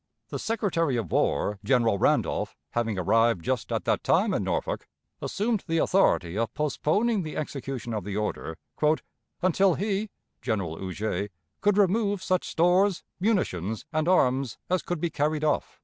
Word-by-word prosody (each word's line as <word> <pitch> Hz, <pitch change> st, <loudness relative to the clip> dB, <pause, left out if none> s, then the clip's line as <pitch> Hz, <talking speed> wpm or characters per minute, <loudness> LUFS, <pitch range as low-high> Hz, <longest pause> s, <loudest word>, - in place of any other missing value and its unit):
The -, -, -4 dB
Secretary 170 Hz, -, 0 dB
of 105 Hz, -9 st, -3 dB
War, 100 Hz, +8 st, +1 dB
General 115 Hz, -3 st, +2 dB
Randolph, -, -, +1 dB
having 115 Hz, -3 st, -1 dB
arrived 110 Hz, 0 st, +2 dB
just 130 Hz, -6 st, -1 dB
at -, -, -1 dB
that -, -, +1 dB
time -, -, +3 dB
in -, -, 0 dB
Norfolk, -, -, -2 dB, 0.3 s
assumed 215 Hz, 0 st, -1 dB
the 165 Hz, -1 st, +1 dB
authority 95 Hz, -, +2 dB
of 115 Hz, -, 0 dB
postponing 190 Hz, -, +1 dB
the 155 Hz, -3 st, -5 dB
execution 135 Hz, -5 st, -4 dB
of 105 Hz, -3 st, -2 dB
the 100 Hz, +1 st, -4 dB
order 95 Hz, -6 st, -3 dB, 0.9 s
"until 185 Hz, 0 st, +4 dB
he 205 Hz, +1 st, -1 dB, 0.3 s
[General 90 Hz, -7 st, -2 dB
Huger] 100 Hz, +1 st, -3 dB, 0.3 s
could 205 Hz, -1 st, +3 dB
remove 200 Hz, 0 st, +2 dB
such 185 Hz, -1 st, 0 dB
stores, 180 Hz, +3 st, +3 dB, 0.2 s
munitions, 110 Hz, -, 0 dB
and 155 Hz, +1 st, +1 dB
arms 135 Hz, -, +2 dB
as 185 Hz, -, +2 dB
could 175 Hz, -2 st, -3 dB
be 170 Hz, +1 st, -1 dB
carried 150 Hz, +1 st, 0 dB
off." 150 Hz, -2 st, 0 dB
150 Hz, 150 wpm, -27 LUFS, -, 0.9 s, until